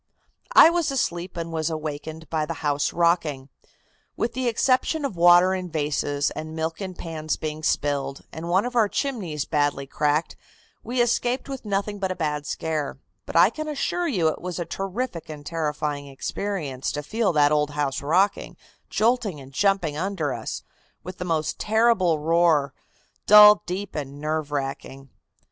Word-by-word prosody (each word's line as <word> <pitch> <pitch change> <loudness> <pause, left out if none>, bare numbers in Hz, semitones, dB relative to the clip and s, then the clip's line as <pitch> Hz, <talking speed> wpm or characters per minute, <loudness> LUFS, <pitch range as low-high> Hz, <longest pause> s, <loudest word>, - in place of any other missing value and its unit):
"I 325 - +9
was 345 -2 0
asleep 175 -10 -2
and 165 0 -4
was 160 0 -1
awakened 155 0 -5
by 155 -2 0
the 165 - -4
house 145 0 +1
rocking. 165 -6 +1 0.7
With 235 0 -1
the 255 0 -2
exception 260 +6 +1
of 265 - -3
water 175 +2 +6
in 185 -1 -4
vases, 145 -2 -1
and 155 +1 -6
milk 160 +3 -3
in 190 -2 -5
pans 155 -2 -4
being 155 0 -5
spilled, 140 -3 -1
and 165 +2 -6
one 190 +5 +3
of 245 0 -5
our 220 -3 +4
chimneys 190 - -2
badly 145 -2 0
cracked, 150 +3 0 0.5
we 245 0 +1
escaped 245 +2 0
with 270 -4 -7
nothing 205 0 -2
but 190 -1 -1
a - - -3
bad 150 -4 -2
scare, 155 -3 -3 0.3
but - - -7
I - - +6
can 310 0 -5
assure 325 +4 -1
you 185 - +1
it - - -5
was 180 -1 -5
a 175 - -3
terrific 195 -1 -4
and 150 -1 -8
terrifying 150 -3 -3
experience 140 -1 -4
to 150 - -4
feel 220 +4 0
that 145 -1 +4
old 150 -1 +2
house 145 -2 -2
rocking, 180 +8 +1 0.3
jolting 220 - +1
and 135 0 -13
jumping 190 -4 +1
under 170 -5 -2
us, - - -5 0.4
with 185 +2 -8
the 180 - -3
most 160 -3 -1
terrible 215 -6 +3
roar, 160 -3 +2 0.5
dull, 210 0 +9
deep 190 +2 -4
and 140 -1 -6
nerve 155 0 -2
racking. 135 -1 -5
165 Hz, 165 wpm, -24 LUFS, 150-200 Hz, 0.7 s, I